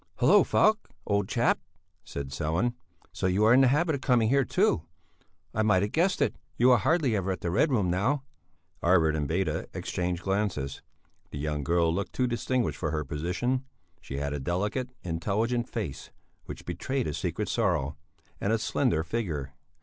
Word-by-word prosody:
"Hallo! -, -, +6 dB
Falk, 220 Hz, +1 st, +2 dB, 0.2 s
old 100 Hz, -1 st, 0 dB
chap!" 120 Hz, 0 st, +2 dB, 0.4 s
said 70 Hz, -1 st, -6 dB
Sellén. 80 Hz, -, 0 dB, 0.4 s
"So -, -, -1 dB
you 95 Hz, +3 st, +2 dB
are 115 Hz, -, +6 dB
in 130 Hz, -, +7 dB
the 135 Hz, -, +6 dB
habit 155 Hz, +5 st, +2 dB
of 140 Hz, -, -3 dB
coming 120 Hz, -4 st, +3 dB
here 140 Hz, +2 st, +4 dB
too? 100 Hz, -, +2 dB, 0.7 s
I 110 Hz, -, +1 dB
might 105 Hz, -3 st, +3 dB
have 105 Hz, -, -2 dB
guessed 180 Hz, +4 st, +2 dB
it, -, -, -1 dB, 0.2 s
you 125 Hz, +2 st, +5 dB
are 125 Hz, -, +6 dB
hardly 145 Hz, -, +2 dB
ever 95 Hz, -1 st, -1 dB
at 90 Hz, -4 st, -4 dB
the 85 Hz, -, -2 dB
Red 150 Hz, -, +3 dB
Room 100 Hz, -8 st, +2 dB
now." 130 Hz, +10 st, +1 dB, 0.6 s
Arvid 85 Hz, -3 st, +4 dB
and 75 Hz, -2 st, -1 dB
Beda 80 Hz, -1 st, -1 dB
exchanged 90 Hz, -1 st, -2 dB
glances. 95 Hz, -9 st, -1 dB, 0.5 s
The -, -, -7 dB
young 75 Hz, 0 st, -2 dB
girl 85 Hz, +2 st, +2 dB
looked 100 Hz, +3 st, -3 dB
too 130 Hz, -, +1 dB
distinguished 120 Hz, +1 st, -1 dB
for 80 Hz, -, -1 dB
her 75 Hz, -1 st, -2 dB
position; 90 Hz, -, -1 dB, 0.4 s
she 70 Hz, -, -6 dB
had 70 Hz, 0 st, -2 dB
a 75 Hz, -, -3 dB
delicate, 105 Hz, -, -1 dB
intelligent 110 Hz, +8 st, -1 dB
face, 100 Hz, -, -5 dB, 0.4 s
which -, -, -9 dB
betrayed 135 Hz, -1 st, -2 dB
a 75 Hz, -, -2 dB
secret -, -, -2 dB
sorrow; 70 Hz, +3 st, 0 dB, 0.4 s
and 100 Hz, -, 0 dB
a 115 Hz, -, +3 dB
slender 110 Hz, -, +1 dB
figure. 80 Hz, -, -3 dB
100 Hz, 180 wpm, -28 LUFS, 80-120 Hz, 0.7 s, in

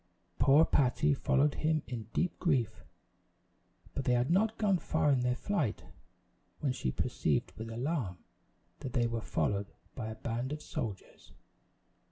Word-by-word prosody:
Poor 145 Hz, +4 st, +6 dB
Patty 145 Hz, +3 st, +3 dB
followed 140 Hz, +1 st, +2 dB
him 155 Hz, -1 st, 0 dB
in 115 Hz, -4 st, -6 dB
deep 180 Hz, -, -1 dB
grief; 135 Hz, -, +1 dB, 1.1 s
but 135 Hz, -, -2 dB
they 125 Hz, -, +3 dB
had 125 Hz, +4 st, +2 dB
not 215 Hz, +5 st, +2 dB
gone 200 Hz, -4 st, +2 dB
far 155 Hz, -3 st, +1 dB
in 135 Hz, -, +3 dB
their 125 Hz, 0 st, +1 dB
flight, 155 Hz, -, -1 dB, 0.8 s
when 140 Hz, -, 0 dB
she 65 Hz, -, -2 dB
perceived -, -, 0 dB
with 110 Hz, +1 st, -6 dB
alarm, 120 Hz, -, -2 dB, 0.6 s
that 125 Hz, -, -6 dB
they 120 Hz, -2 st, +2 dB
were 115 Hz, -1 st, -1 dB
followed 100 Hz, -1 st, -1 dB, 0.2 s
by 115 Hz, -4 st, -5 dB
a 110 Hz, -, -5 dB
band 120 Hz, +4 st, -3 dB
of 150 Hz, -, -3 dB
soldiers. 105 Hz, -5 st, -6 dB
130 Hz, 150 wpm, -32 LUFS, 115-155 Hz, 1.1 s, Poor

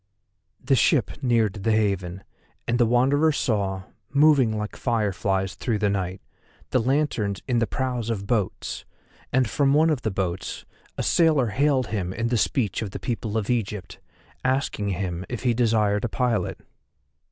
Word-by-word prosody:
The 135 Hz, +2 st, 0 dB
ship 130 Hz, -, +2 dB
neared 115 Hz, -6 st, +1 dB
the 110 Hz, +3 st, +2 dB
haven 95 Hz, -4 st, 0 dB, 0.4 s
and 120 Hz, +1 st, +1 dB
the 120 Hz, -, +4 dB
Wanderer 135 Hz, +6 st, +3 dB
saw, 100 Hz, -9 st, -1 dB, 0.3 s
moving 140 Hz, -6 st, +4 dB
like 105 Hz, 0 st, -4 dB
fireflies 100 Hz, -4 st, 0 dB
through 115 Hz, -3 st, -2 dB
the 105 Hz, -1 st, +1 dB
night, 95 Hz, -1 st, -3 dB, 0.5 s
the 130 Hz, -, +3 dB
lanterns 120 Hz, -6 st, 0 dB
in 120 Hz, -2 st, +2 dB
the 115 Hz, -, +1 dB
prows 125 Hz, -1 st, -2 dB
of 100 Hz, -4 st, -2 dB
boats, 105 Hz, -4 st, -2 dB, 0.5 s
and 130 Hz, -2 st, +2 dB
from 140 Hz, +4 st, +2 dB
one 160 Hz, +2 st, +4 dB
of 145 Hz, -5 st, -1 dB
the 110 Hz, -, -1 dB
boats 95 Hz, -2 st, -3 dB, 0.3 s
a -, -, -1 dB
sailor 155 Hz, -8 st, +3 dB
hailed 135 Hz, +4 st, +2 dB
him 95 Hz, -3 st, -2 dB
in 115 Hz, +3 st, -1 dB
the 120 Hz, -, +1 dB
speech 110 Hz, -2 st, 0 dB
of 110 Hz, -, -3 dB
the -, -, -7 dB
people 115 Hz, -3 st, -3 dB
of 110 Hz, +1 st, -1 dB
Egypt, 105 Hz, -5 st, -3 dB, 0.4 s
asking 130 Hz, -6 st, 0 dB
him 90 Hz, -2 st, -3 dB
if 120 Hz, 0 st, -5 dB
he 125 Hz, -2 st, +3 dB
desired 110 Hz, -3 st, +2 dB
a 120 Hz, -, 0 dB
pilot. 125 Hz, -1 st, -1 dB
115 Hz, 165 wpm, -24 LUFS, 100-130 Hz, 0.5 s, the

